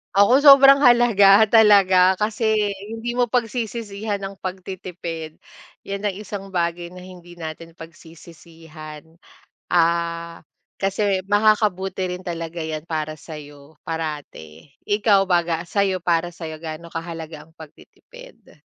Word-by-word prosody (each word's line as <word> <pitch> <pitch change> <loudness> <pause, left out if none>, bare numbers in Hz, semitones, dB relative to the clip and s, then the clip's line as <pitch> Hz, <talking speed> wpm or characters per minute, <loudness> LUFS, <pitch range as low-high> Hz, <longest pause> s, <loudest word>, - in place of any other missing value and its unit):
Ako 240 +8 +5
sobrang 275 0 +8
halaga, 220 -4 +6
talaga 190 -4 +5
kasi 215 -1 0 0.2
hindi 230 +2 -5
mo 245 -2 0
pagsisisihan 220 -3 -3
ang 195 0 -7
pagtitipid. 180 -4 -7 0.5
Yan 200 +1 -5
ang 205 - 0
isang 195 0 -8
bagay 170 -1 -2
na 180 - -11
hindi 175 -1 -14
natin 165 +1 -8
pagsisisihan. 160 -1 -13 0.6
Ah, 170 0 0 0.4
kasi 195 0 0
makakabuti 205 -3 +1
rin 185 - -14
talaga 165 -1 -5
yan 160 +1 -6
para 155 -1 -4
sayo 150 -1 -12
parati. 150 - -7 0.2
Ikaw 205 -2 +2
baga, 170 -2 +1
sa'yo, 195 -1 0
para 170 0 0
sa'yo 165 -2 -8
gaano 160 +1 -8
kahalaga 165 -2 -8
ang 160 - -25
pagtitipid? - - -17
180 Hz, 115 wpm, -21 LUFS, 165-205 Hz, 0.6 s, sobrang